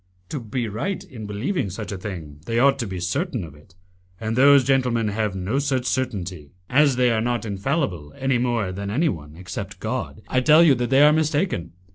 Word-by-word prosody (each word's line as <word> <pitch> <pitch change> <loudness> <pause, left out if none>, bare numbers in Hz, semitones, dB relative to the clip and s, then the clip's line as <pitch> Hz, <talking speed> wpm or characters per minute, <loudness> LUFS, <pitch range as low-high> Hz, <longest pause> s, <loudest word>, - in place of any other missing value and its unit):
"To 150 - -3
be 115 +1 -3
right 180 - -3
in 125 - -9
believing 105 - -2
such 100 +2 -6
a 100 - -4
thing, 80 -7 -7
they 115 - -1
ought 135 +3 +4
to 120 - -2
be 95 -2 -5
certain 125 - -2
of 80 -4 -9
it, 75 +4 -20 0.4
and 110 0 -2
those 140 +1 +6
gentlemen 125 -5 +1
have 105 -1 -1
no 95 +8 -1
such 135 -3 0
certainty. 95 - -3 0.2
As 140 0 +4
they 125 -1 +3
are 110 -1 +1
not 120 -1 -1
infallible 100 - -2
any 135 -2 +1
more 120 -6 0
than 100 +2 -5
any 150 +10 +1
one, 75 -4 -6
except 90 0 -7
God, - - -4
I 130 - +1
tell 155 +5 +6
you 155 -5 +6
that 120 -2 -1
they 135 +2 +5
are 150 +1 +7
mistaken. 155 - 0
120 Hz, 205 wpm, -23 LUFS, 95-135 Hz, 0.4 s, are